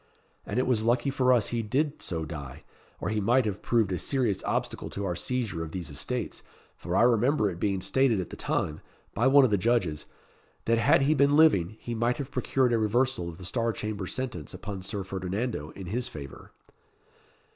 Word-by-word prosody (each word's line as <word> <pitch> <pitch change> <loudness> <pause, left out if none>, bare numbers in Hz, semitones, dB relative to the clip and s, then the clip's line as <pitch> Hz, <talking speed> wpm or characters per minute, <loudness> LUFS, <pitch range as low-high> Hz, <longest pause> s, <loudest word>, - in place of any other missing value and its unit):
And - - -3
it 130 - +2
was 115 -4 +1
lucky 120 +4 +2
for 130 -1 +3
us 120 -5 +3
he 120 -1 -1
did 140 +7 -1
so 80 -2 -3
die, 75 -4 -8 0.4
or - - -2
he 105 0 0
might 120 +4 +3
have 105 -2 -3
proved 115 -5 +1
a 90 - -1
serious 120 -8 0
obstacle - - -2
to 100 - -4
our 90 -2 -1
seizure 110 -4 -2
of 80 - -8
these 90 -6 -5
estates, 120 - -3 0.3
for 90 - -4
I - - +5
remember 120 -2 +3
it 85 - -8
being 95 0 0
stated 130 -3 +2
at 90 - -5
the - - -6
time, 75 0 -2 0.3
by 115 +6 +2
one 140 0 +7
of 120 - 0
the 100 - +3
judges, 90 -9 0 0.6
that 115 0 +3
had 135 +4 +4
he 145 +3 +4
been 140 0 +4
living, 110 - +4
he 120 - -5
might 120 +2 0
have 140 -1 -5
procured 125 -1 +1
a 115 - +3
reversal 115 -3 +1
of 80 - -10
the 90 - -8
Star 115 +5 0
Chamber 105 -3 -4
sentence 120 - -5
upon 100 -2 -6
Sir 95 +1 -4
Ferdinando 95 -2 -3
in 95 - -7
his 120 +7 -2
favour." 70 -3 -10
110 Hz, 205 wpm, -28 LUFS, 95-125 Hz, 0.6 s, one